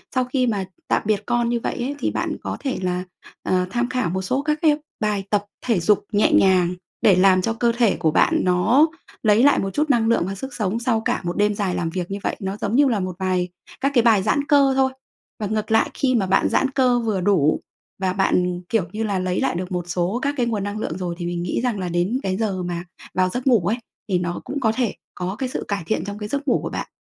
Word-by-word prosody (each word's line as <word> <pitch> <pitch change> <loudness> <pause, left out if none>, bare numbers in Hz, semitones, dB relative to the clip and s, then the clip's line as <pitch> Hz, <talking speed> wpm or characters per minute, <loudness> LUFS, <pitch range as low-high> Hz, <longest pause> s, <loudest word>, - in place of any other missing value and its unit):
sau 255 - +3
khi 255 0 0
mà 205 -4 -1 0.2
tạm - - +2
biệt 210 -1 +1
con 240 -1 +1
như 240 - 0
vậy - - -3
ấy, 270 +4 -2
thì - - 0
bạn - - -2
có - - -3
thể 270 -2 -2
là, 180 0 -1 0.4
ờ, 185 0 +1
tham 240 +4 -1
khảo 255 -9 0
một 190 +2 -2
số 255 +9 -1
các 300 +1 -1
cái 300 -2 +4 0.2
bài 210 -2 0
tập 205 -1 +1 0.2
thể 230 -7 +2
dục 195 +4 +2
nhẹ 210 0 +3
nhàng 180 -2 +4 0.3
để 200 - +6
làm 185 0 +5
cho 225 +4 0
cơ 235 +1 +1
thể 235 -4 +3
của 160 -2 +1
bạn - - +3
nó 185 - +4 0.4
lấy 215 +2 +4
lại 285 - +5
một 195 - -1
chút 300 +1 0
năng 235 -4 +3
lượng 230 - +3
và 195 - -4
sức 265 +6 -7
sống 210 +1 -1
sau 235 -2 +1
cả - - -1
một 175 +2 -3
đêm 210 0 +3
dài 195 -3 -1
làm 165 - -1
việc 180 +2 -4
như 200 - -2
vậy, - - -1
nó 195 0 -4
giống 210 +2 -2
như 285 +1 +5
là 225 -5 +1
một 185 -1 -3
vài 185 -1 0 0.3
các 275 +1 +2
cái 240 - +6
bài 220 -5 +4
giãn 280 +7 +1
cơ 280 -2 +5
thôi. 265 0 +3 0.5
Và 210 - -2
ngược 215 +1 -2
lại, 225 - +3
khi 255 -2 +1
mà 210 -5 +2
bạn 185 - +2
giãn 270 - +2
cơ 255 -3 +3
vừa 215 -5 -1
đủ 175 -6 +3 0.4
và 185 -1 +1
bạn, 180 -2 +1
kiểu 225 -5 +2
như 215 +2 -3
là, 200 -3 -1
lấy 185 0 -1
lại - - 0
được 180 +2 -4
một 180 -1 -1
số 180 +6 -1
các 285 +1 0
cái 245 - +2
nguồn 220 -4 -1
năng 205 +1 -4
lượng 165 -5 -3
rồi 180 -2 -3
thì 175 - -4
mình 175 0 -2
nghĩ 180 +6 -1
rằng 240 -5 0
là 180 -1 -3
đến 175 +9 0
cái 190 0 -1
giờ 195 -5 -1
mà 175 -1 -3 0.3
vào 185 0 +2
giấc 250 +7 -4
ngủ 245 -4 +6
ấy, 220 +4 +1 0.3
thì 185 -2 +2
nó 175 0 -3
cũng 285 - -4
có 225 -5 +2
thể 245 -5 0 0.2
có 180 +2 -3
cái 260 -2 -2
sự - - -4
cải 200 -3 -2
thiện 220 - 0
trong 205 0 -5
cái 210 0 -6
giấc 280 +3 -3
ngủ - - +3
của - - -3
bạn, - - -4
205 Hz, 265 wpm, -22 LUFS, 185-240 Hz, 0.5 s, để